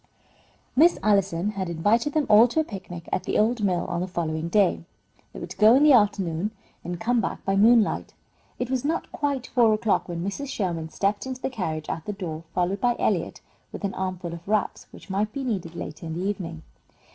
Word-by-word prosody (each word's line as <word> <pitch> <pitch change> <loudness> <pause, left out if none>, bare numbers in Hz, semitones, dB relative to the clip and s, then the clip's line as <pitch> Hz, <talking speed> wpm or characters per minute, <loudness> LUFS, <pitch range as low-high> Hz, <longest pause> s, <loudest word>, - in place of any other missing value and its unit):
Miss 330 +6 +5
Allison 195 -2 +2
had 190 -3 -4
invited 210 - +1
them 310 -2 +2
all 215 +3 +7
to 250 - -1
a - - +3
picnic 185 - -8
at - - -1
the - - -1
old 220 +1 +2
mill 180 -3 +1
on 175 -1 -2
the 185 - -2
following 165 -2 -3
day. 200 -2 +2 0.5
They - - -9
were - - -5
to - - -11
go 215 +3 +7
in 275 - +5
the 300 -2 +7
afternoon 200 -5 +2 0.3
and 175 -1 -5
come 240 +3 +1
back - - -4
by 195 - +1
moonlight. 220 +2 +3 0.4
It 250 +1 -3
was 260 -2 0
not 320 +4 -2
quite 280 -3 -2
four 230 -4 +3
o'clock 215 -3 0
when 170 0 -4
Mrs. 240 +9 -4
Sherman 170 -9 -2
stepped 200 +7 -1
into 260 -1 -5
the - - -1
carriage 160 -9 -3
at 160 - -4
the 210 - -3
door, 165 -5 -6
followed 185 +2 0
by 240 -1 +2
Eliot - - -1 0.3
with - - -8
an 195 - -1
armful 185 -2 -4
of 170 +1 -10
wraps, 210 0 -1
which 195 - -12
might 210 +2 0
be 275 - -4
needed 185 -9 -3
later 160 +1 -7
in 160 - -4
the 185 - -2
evening. 170 -6 -4
200 Hz, 215 wpm, -25 LUFS, 175-235 Hz, 0.5 s, all